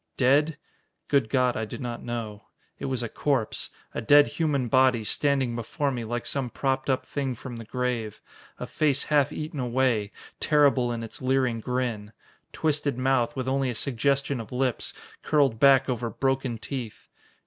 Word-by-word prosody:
Dead? 145 +4 +3 0.5
Good 140 -6 +2
God, 125 -1 +2
I 110 - -2
do - - -7
not 120 -4 -5
know. 110 -4 -5 0.3
It - - -4
was 130 -2 -2
a - - -2
corpse, 130 -1 -1 0.2
a - - -3
dead 145 +5 +7
human 145 -7 -1
body, 130 -2 +3
standing 135 0 +1
before 130 +5 -2
me 120 -3 -3
like 120 +1 -3
some 135 -3 -1
propped 135 +2 -1
up 130 -1 +1
thing 135 -3 -3
from 120 +1 -8
the 115 - -8
grave. 120 -2 -2 0.4
A - - -5
face 145 -3 +1
half 145 0 +4
eaten 155 0 -5
away, 120 -4 +1 0.3
terrible 140 -5 +3
in 115 -1 -3
its 115 - -8
leering 130 -2 +1
grin. 115 -3 -3 0.4
Twisted 145 -4 0
mouth, 130 -2 +1
with 130 -1 -3
only 135 0 +1
a 120 - -3
suggestion 140 +2 0
of 115 - -8
lips, 125 -1 -1 0.3
curled 140 -7 +2
back 135 0 +6
over 120 -2 -2
broken 135 -2 -1
teeth. 120 -1 -6
130 Hz, 170 wpm, -26 LUFS, 120-140 Hz, 0.5 s, dead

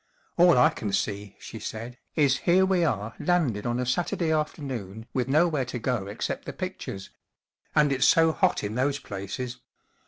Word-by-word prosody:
4f - - +7
All 175 -5 +7
I 125 - +6
can 105 - -4
see/' 100 0 -2
she 110 - -9
said, 115 +4 -7 0.2
is 140 -4 +3
here 185 +2 +6
we 190 -2 +2
are 110 -7 -1
landed 145 - +1
on 120 +1 -1
a 125 - -1
Saturday 165 +4 0
afternoon 130 - -3
with 125 -2 0
nowhere 150 -1 +2
to 125 - -5
go 120 -4 -1
except 100 - -4
the - - -5
pictures. 95 0 -6 0.6
And 150 -1 +4
it's 135 - +3
so 165 0 +5
hot 185 +3 +1
in 105 +1 -3
those 135 +4 +1
places. 120 +2 -6
125 Hz, 180 wpm, -26 LUFS, 110-155 Hz, 0.6 s, 4f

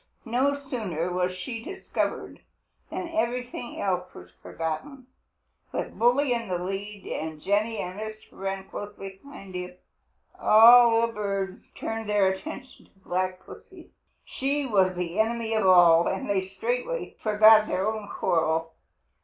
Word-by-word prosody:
No 260 +5 +1
sooner 215 - -4
was 180 0 0
she 225 +6 -6
discovered 385 +5 -4 0.5
than 365 -1 -4
everything 250 -6 -3
else 180 -2 -1
was 90 0 -12
forgotten. 250 - -5 0.7
With - - -4
Bully 250 +3 +3
in 230 -2 -3
the 180 -2 -1
lead, 195 +3 -5
and 155 -1 -5
Jenny 210 +6 0
and 180 +3 -5
Mr. 215 0 -5 0.2
Wren 195 0 -5
close 205 0 -7
behind 195 +1 -11
him, 180 0 -6 0.6
all 230 +1 +7
the 230 - -6
birds 195 -2 -4
turned 225 -1 -4
their 205 -2 +3
attention 190 +7 -7
to 195 - -31
Black 185 +1 -2
Pussy. - - -14 0.3
She 280 +2 -2
was 190 -6 +2
the 175 +1 -3
enemy 225 0 0
of 215 -3 +2
all, 170 -2 +7
and 190 - -2
they 190 -2 0
straightway 245 - -3
forgot 215 0 +6
their 190 +3 -1
own 215 -1 -3
quarrel. 165 0 0
205 Hz, 140 wpm, -26 LUFS, 185-235 Hz, 0.7 s, all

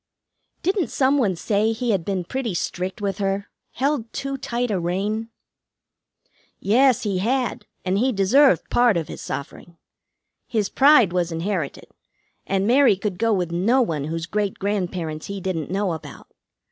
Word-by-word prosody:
"Didn't 375 - +1
some 270 +4 +2
one 200 -8 +1
say 210 +5 +1
he 235 +1 -1
had 190 -5 0
been 190 0 -2
pretty 235 +1 -3
strict 185 +4 -3
with 195 0 -2
her? 195 0 -2 0.2
Held 265 -4 -1
too 275 0 -4
tight 245 -2 -2
a 195 - 0
rein?" 200 +6 -2 1.3
"Yes, 250 +4 +3
he 200 -4 -1
had, 250 +5 -1 0.2
and 190 +2 +1
he 260 +3 +2
deserved 255 +7 +3
part 240 -5 +4
of 160 -3 -2
his - - -8
suffering. 165 +4 -7 0.7
His 215 -4 -1
pride 270 - +5
was 175 -1 0
inherited, 165 -2 -3 0.6
and 195 0 0
Mary 245 -1 +5
could 190 -1 -4
go 230 0 +2
with 180 -5 0
no 225 +10 +3
one 155 -9 -2
whose 165 +1 -3
great 205 +2 -2
grandparents 180 -6 -3
he 200 0 -5
didn't 180 -4 -3
know 195 -1 0
about. 160 - -10
200 Hz, 160 wpm, -23 LUFS, 180-240 Hz, 1.3 s, pride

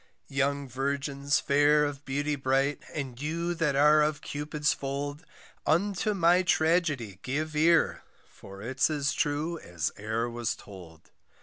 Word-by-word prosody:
Young 140 0 0
virgins 140 +2 -1
fair 145 +1 +4
of 145 -1 -5
beauty 145 +2 -1
bright, 135 +1 0
And 135 -4 -5
you 170 +3 -2
that 165 -4 0
are 150 +2 +6
of 150 -1 0
Cupid's 150 +1 -1
fold, 145 +3 -4 0.4
Unto 200 +6 +1
my 175 0 +4
tragedy 160 - +1
give 150 +4 -3
ear, 165 +2 +3 0.3
For 100 +1 -12
it's 130 +6 +1
as 145 -3 0
true 155 +3 -1
as 85 -4 -3
e'er 110 +3 -1
was 120 -1 -2
told. 85 -5 -14
145 Hz, 135 wpm, -28 LUFS, 135-155 Hz, 0.4 s, are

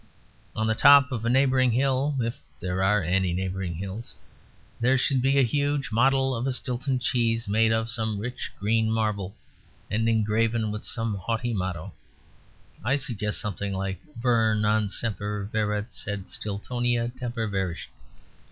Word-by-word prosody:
On 110 - 0
the 110 - +2
top 140 +4 +7
of 115 -3 -3
a - - +2
neighbouring 130 0 +4
hill 135 +3 +1
(if 115 -1 -2 0.2
there 95 +1 -1
are 100 0 +3
any 90 +1 +1
neighbouring 95 -1 -3
hills) 100 +6 -6 0.6
there 125 +3 +3
should 130 0 +2
be 135 +2 +3
a 135 - +6
huge 145 +2 0
model 135 +3 +3
of 120 +2 -2
a - - +1
Stilton 130 +1 -2
cheese, 115 -2 0
made 110 +2 +3
of 110 0 +1
some 110 -2 -2
rich 125 +5 -5
green 110 +2 +2
marble 105 -4 -1 0.6
and 115 +2 +1
engraven 110 0 +1
with 105 0 -5
some 115 -2 -2
haughty 115 +5 -2
motto: 95 -2 -3 0.9
I 125 +5 +2
suggest 115 -7 -2
something 100 -1 -3
like 95 0 -3 0.2
'Ver 115 -3 +3
non 105 0 +2
semper 105 -1 -3
viret; 105 +1 -1
sed 100 -3 -4
Stiltonia 120 +3 -2
semper 120 -3 -2
virescit.'" 95 -4 -3
110 Hz, 150 wpm, -26 LUFS, 100-125 Hz, 0.9 s, top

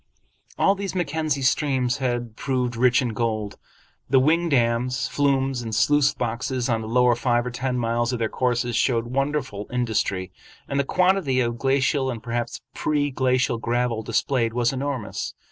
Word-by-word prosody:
All 195 - +4
these 195 -1 -5
Mackenzie 155 -4 -1
streams 130 -2 +1
had 120 -4 -2
proved 125 -2 -1
rich 125 +2 +3
in 125 - -1
gold. 110 -2 -2 0.5
The 135 - +4
wing 165 +5 +2
dams, 125 -1 +1
flumes, 135 -2 +1
and 115 -2 -4
sluice 145 +3 +4
boxes 120 +1 -2
on 115 -1 +1
the 110 - -6
lower 125 +1 +4
five 120 0 +1
or 125 - -3
ten 125 +1 -2
miles 120 0 0
of 125 - -1
their 115 -1 0
courses 120 0 -1
showed 115 -3 +1
wonderful 135 -4 -2
industry, 110 -6 -1 0.4
and 140 - -1
the - - +3
quantity 180 -6 +2
of 120 -1 -1
glacial 135 +1 +1
and 115 -3 -5
perhaps 120 -1 -3
pre 145 -1 0
glacial 130 -2 +1
gravel 120 -1 0
displayed 115 0 0
was 120 +1 +1
enormous. 130 -4 -4
125 Hz, 160 wpm, -24 LUFS, 120-135 Hz, 0.5 s, All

